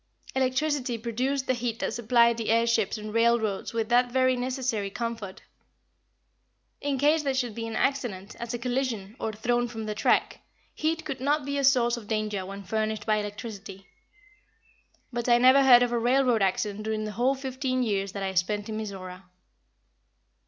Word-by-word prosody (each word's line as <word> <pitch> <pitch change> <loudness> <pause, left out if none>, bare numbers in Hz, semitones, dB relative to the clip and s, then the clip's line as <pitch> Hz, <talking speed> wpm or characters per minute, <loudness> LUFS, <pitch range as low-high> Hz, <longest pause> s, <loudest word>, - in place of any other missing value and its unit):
Electricity 260 -1 0
produced 255 +4 -2
the 255 - +1
heat 240 -2 -3
that - - -2
supplied 235 0 +3
the 225 - -3
air 230 +1 +4
ships 230 -2 +1
and 215 0 -7
railroads 230 -3 +1
with 225 -1 -2
that 245 0 +3
very 255 0 +3
necessary 250 -5 -2
comfort. 225 -3 -5 1.4
In 285 -1 -1
case 300 +4 +3
there 275 -2 -1
should 245 -4 -1
be 230 +1 -5
an 225 - -5
accident, 230 -8 -2
as 235 -1 -5
a 240 - -2
collision, 240 -4 -2
or 220 - -2
thrown 240 +3 0
from 225 -2 -6
the 215 - -3
track, 210 - +1 0.3
heat 325 +1 -1
could 275 -4 -4
not 290 +2 0
be 280 0 -3
a - - -1
source 245 -3 +3
of 220 -3 -10
danger 215 -3 -2
when 200 +1 -8
furnished 215 +2 -2
by 215 -1 +2
electricity. 205 -2 -7 1.3
But 240 0 -2
I 240 - +6
never 260 +3 +6
heard 245 -2 +7
of 245 - 0
a 240 - +1
railroad 245 -1 +2
accident 200 +2 0
during 215 0 -2
the 215 - -4
whole 250 +5 +1
fifteen 260 -1 -2
years 200 -3 -1
that 200 - -4
I 190 0 -2
spent 205 +3 -1
in 215 - -3
Mizora. 190 -3 -7
235 Hz, 180 wpm, -27 LUFS, 215-255 Hz, 1.4 s, heard